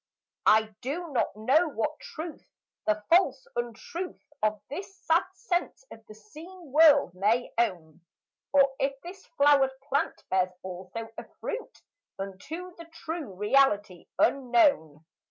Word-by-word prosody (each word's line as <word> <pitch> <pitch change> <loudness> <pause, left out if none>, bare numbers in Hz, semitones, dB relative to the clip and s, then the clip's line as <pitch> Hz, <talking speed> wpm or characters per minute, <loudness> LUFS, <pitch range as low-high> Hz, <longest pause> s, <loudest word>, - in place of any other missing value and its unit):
I 220 +1 +7 0.2
do 315 +7 -4
not 240 -6 0
know 270 +11 +3
what 300 +2 -3
truth 320 +1 -8 0.4
the 215 0 +1
false 310 -7 +3
untruth 240 +10 -5 0.2
Of 215 0 +1
this 390 +6 -7
sad 330 +3 +3
sense 365 +3 -2
of 225 - -12
the 215 - -12
seen 310 - -13
world 290 - +6
may 210 +6 +1
own, 170 -7 -1 0.5
Or 275 -1 +5
if 275 0 -1
this 375 +3 -10
flowered 275 -2 +4
plant 280 +1 -1
bears 185 -1 +2
also 185 +5 -7
a - - -9
fruit 480 - -6 0.3
Unto 310 - -7
the 335 - -10
true 325 - -6
reality 210 -4 +2
unknown. 235 - +2
270 Hz, 130 wpm, -28 LUFS, 210-325 Hz, 0.5 s, I